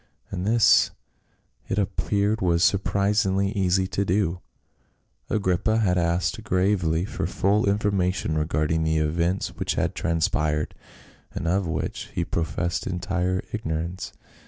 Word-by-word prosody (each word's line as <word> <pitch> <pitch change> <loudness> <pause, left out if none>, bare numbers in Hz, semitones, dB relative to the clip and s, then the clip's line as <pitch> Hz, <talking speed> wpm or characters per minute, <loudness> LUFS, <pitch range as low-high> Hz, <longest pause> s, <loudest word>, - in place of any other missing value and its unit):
And 95 0 -3
this 115 0 +5 0.8
it 95 - -2
appeared 100 +1 0
was 85 -2 +2
surprisingly 100 0 +2
easy 95 -1 +1
to 100 - 0
do. 90 -2 0 0.9
Agrippa 100 +1 +1
had 100 -5 +2
asked 85 -1 0
gravely 90 -3 +1
for - - -3
full 100 +1 +1
information 95 -5 0
regard 75 0 0
ing 80 0 +1
the 80 0 +1
events 85 +4 0
which - - -1
had - - 0
transpired, 80 -3 0 0.6
and 85 - -3
of 95 +1 +1
which 80 -2 -3
he - - 0
professed 85 +1 -2
entire 95 0 -1
ignorance. 85 -2 -3
90 Hz, 125 wpm, -25 LUFS, 85-100 Hz, 0.9 s, this